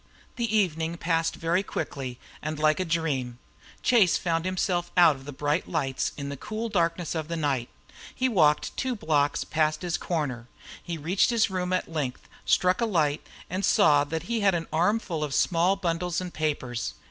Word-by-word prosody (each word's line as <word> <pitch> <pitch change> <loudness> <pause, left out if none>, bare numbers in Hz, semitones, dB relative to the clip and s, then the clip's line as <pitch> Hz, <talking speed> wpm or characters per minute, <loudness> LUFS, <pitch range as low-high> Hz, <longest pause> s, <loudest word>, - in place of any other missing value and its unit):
The 230 -3 0
evening 165 -4 0
passed 165 -1 0
very 170 +3 +1
quickly 135 -9 -5 0.2
and 155 +1 -3
like 155 +2 +2
a 185 - 0
dream. 145 -8 -1 0.5
Chase 215 -9 +4
found 165 -1 -1
himself 180 -1 0
out 170 -4 +7
of 135 0 -13
the 145 - -6
bright 145 +4 -1
lights 135 -6 -1
in 140 -1 -4
the 140 - -4
cool 220 - -4
darkness 170 -3 0
of 160 -2 -3
the 170 - -3
night. 135 -6 -1 0.5
He 260 - +1
walked 155 -11 +2
two 260 -1 -1
blocks 150 -9 +1
past 155 0 0
his 175 -1 -1
corner. 135 -8 -3 0.3
He 170 -1 -5
reached 170 +6 +2
his 230 -4 +2
room 180 -1 -2
at 185 - 0
length, 145 -6 -4 0.2
struck 180 +2 +3
a - - +3
light, 155 -7 +1 0.3
and 185 +3 -3
saw 150 -8 +5
that 160 +2 -4
he 230 +4 -1
had 195 -3 +3
an 165 -1 -2
armful 175 -1 +1
of 145 -2 -2
small 180 +2 +3
bundles 175 -2 -1
and 180 -1 -6
papers. 130 - -2
165 Hz, 180 wpm, -27 LUFS, 150-185 Hz, 0.5 s, out